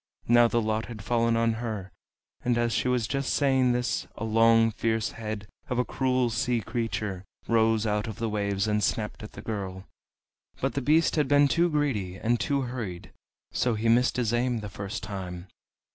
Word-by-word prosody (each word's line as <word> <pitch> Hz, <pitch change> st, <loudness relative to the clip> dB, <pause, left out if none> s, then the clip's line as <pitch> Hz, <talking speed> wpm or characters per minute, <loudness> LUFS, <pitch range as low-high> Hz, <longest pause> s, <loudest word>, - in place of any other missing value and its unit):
Now 120 Hz, 0 st, +6 dB
the 115 Hz, 0 st, +1 dB
lot 110 Hz, +1 st, -1 dB
had 110 Hz, -3 st, -8 dB
fallen 115 Hz, +1 st, +2 dB
on 115 Hz, 0 st, +2 dB
her; 105 Hz, -5 st, -4 dB, 0.5 s
and 120 Hz, -1 st, +1 dB
as 120 Hz, -1 st, +1 dB
she -, -, 0 dB
was 125 Hz, -3 st, +1 dB
just 135 Hz, +2 st, -1 dB
saying 130 Hz, -3 st, +3 dB
this 120 Hz, 0 st, -1 dB
a -, -, -5 dB
long 115 Hz, 0 st, +4 dB
fierce 110 Hz, 0 st, -1 dB
head 110 Hz, -2 st, -6 dB, 0.2 s
of 125 Hz, -, -1 dB
a 125 Hz, -, +2 dB
cruel 130 Hz, -2 st, +1 dB
sea 120 Hz, +1 st, 0 dB
creature 105 Hz, -5 st, -3 dB, 0.2 s
rose 115 Hz, -1 st, +3 dB
out 105 Hz, 0 st, 0 dB
of 110 Hz, -, -5 dB
the 115 Hz, -, -2 dB
waves 100 Hz, -1 st, -1 dB
and 105 Hz, 0 st, +1 dB
snapped 105 Hz, -2 st, -1 dB
at 105 Hz, -, -9 dB
the -, -, -9 dB
girl. 95 Hz, -3 st, -5 dB, 0.7 s
But 135 Hz, -, -1 dB
the 140 Hz, -, -1 dB
beast 155 Hz, +5 st, +3 dB
had 150 Hz, -3 st, +2 dB
been 145 Hz, +1 st, +5 dB
too 170 Hz, +4 st, +2 dB
greedy 130 Hz, -, -1 dB
and 120 Hz, +3 st, +1 dB
too 140 Hz, -1 st, 0 dB
hurried, 120 Hz, -9 st, -5 dB, 0.4 s
so 120 Hz, -2 st, +1 dB
he 110 Hz, +2 st, 0 dB
missed 125 Hz, +3 st, +3 dB
his 120 Hz, -2 st, 0 dB
aim 120 Hz, -1 st, 0 dB
the 105 Hz, -, -6 dB
first 100 Hz, +4 st, -6 dB
time. 90 Hz, -3 st, -6 dB
115 Hz, 190 wpm, -27 LUFS, 105-125 Hz, 0.7 s, Now